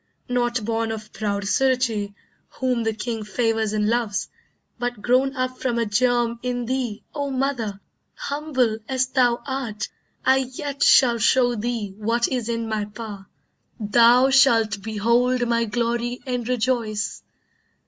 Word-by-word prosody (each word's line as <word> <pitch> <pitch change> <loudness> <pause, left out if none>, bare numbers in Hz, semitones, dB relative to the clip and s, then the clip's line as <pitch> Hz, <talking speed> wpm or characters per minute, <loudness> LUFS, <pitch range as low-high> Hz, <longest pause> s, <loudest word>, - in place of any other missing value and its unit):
Not 240 -2 0
born 225 0 -1
of 215 -1 -7
proud 205 -2 -2
Suruchee, 230 -3 +1 0.3
whom 255 -2 -1
the 225 0 0
king 225 0 -4
Favours 225 0 0
and 210 -1 0
loves, 225 -3 0 0.5
but 245 -2 -3
grown 265 +3 +2
up 255 -1 -2
from 245 -2 -1
a 230 - +1
germ 235 +2 +1
In 245 -1 -2
thee, 245 -3 -3
O 285 -2 -2
mother, 255 -7 -2 0.4
humble 265 -7 -1
as 260 -1 +1
thou 250 -2 +1
art, 255 -6 -4 0.4
I 265 +1 +5
yet 265 +2 -4
shall 240 -3 +6
show 245 +2 +3
thee 225 -3 -3
what 230 +3 +1
is 245 -3 -2
in 230 -1 -2
my 215 -1 -1
power. 210 -2 -9 0.5
Thou 235 +5 +5
shalt 225 -7 +4
behold 235 +4 +1
my 235 0 +1
glory 235 +2 -2
and 245 -2 -3
rejoice. 235 -3 -1
235 Hz, 140 wpm, -23 LUFS, 220-255 Hz, 0.5 s, shall